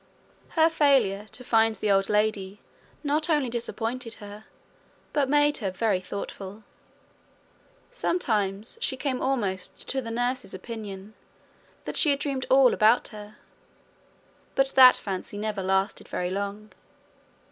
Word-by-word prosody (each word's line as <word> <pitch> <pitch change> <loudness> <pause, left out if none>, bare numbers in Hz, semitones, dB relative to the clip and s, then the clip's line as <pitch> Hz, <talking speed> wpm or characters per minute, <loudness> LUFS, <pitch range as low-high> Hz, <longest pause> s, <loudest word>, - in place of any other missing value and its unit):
Her 320 0 +6
failure 260 -11 +2
to 250 - -6
find 225 -2 +3
the 205 +1 -1
old 195 0 +2
lady 210 -2 0 0.4
not 305 +2 0
only 295 -5 +2
disappointed 235 0 -3
her, 205 +1 -11 0.7
but 280 -3 +1
made 295 +1 +3
her 200 -5 -2
very 195 0 0
thoughtful. 200 +2 -7 1.3
Sometimes 220 - -1
she 265 - -1
came 260 -2 -2
almost 205 -9 -2
to 265 - 0
the 230 - -7
nurse's 245 -2 -2
opinion 205 -1 -8 0.7
that - - -3
she 310 - +4
had 280 - +3
dreamed 275 -2 -3
all 265 -1 +6
about 220 +2 +3
her; 210 -1 -11 1.2
but 270 0 +3
that 255 -1 +8
fancy 195 0 -5
never 210 -1 -3
lasted 190 +1 0
very 180 0 -3
long. 200 +2 -4
220 Hz, 130 wpm, -26 LUFS, 200-265 Hz, 1.3 s, that